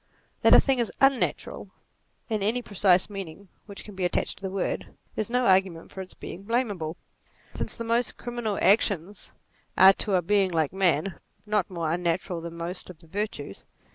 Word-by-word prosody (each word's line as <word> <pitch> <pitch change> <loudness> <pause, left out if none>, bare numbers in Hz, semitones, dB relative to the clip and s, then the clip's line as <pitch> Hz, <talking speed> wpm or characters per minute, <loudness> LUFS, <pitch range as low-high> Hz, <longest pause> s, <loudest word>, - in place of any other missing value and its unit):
That - - +7
a - - +9
thing 270 -2 +2
is 235 - 0
unnatural, 270 - +1 0.6
in 215 -3 -1
any 230 +5 0
precise 190 -3 +3
meaning 195 -2 -8 0.2
which 200 -2 -9
can 210 - -10
be 190 -1 -4
attached 180 - 0
to - - -26
the 190 - -3
word, 195 0 -3 0.2
is 215 - -2
no 250 +1 +1
argument 185 -4 +2
for 190 - -6
its 185 - -10
being 180 - -8
blamable; 205 -8 -1 0.6
since - - -4
the 230 - -4
most 230 +2 0
criminal 240 -4 -3
actions 200 -2 +2 0.5
are 190 +1 +9
to 195 0 -1
a 180 - +2
being 195 +1 +3
like 160 -3 0
man, 185 -1 +1 0.3
not 210 -3 0
more 170 -4 -2
unnatural 175 0 -1
than 170 0 -7
most 175 +3 -5
of 180 - -10
the 165 - -20
virtues. 175 - -5
195 Hz, 180 wpm, -26 LUFS, 175-215 Hz, 0.6 s, a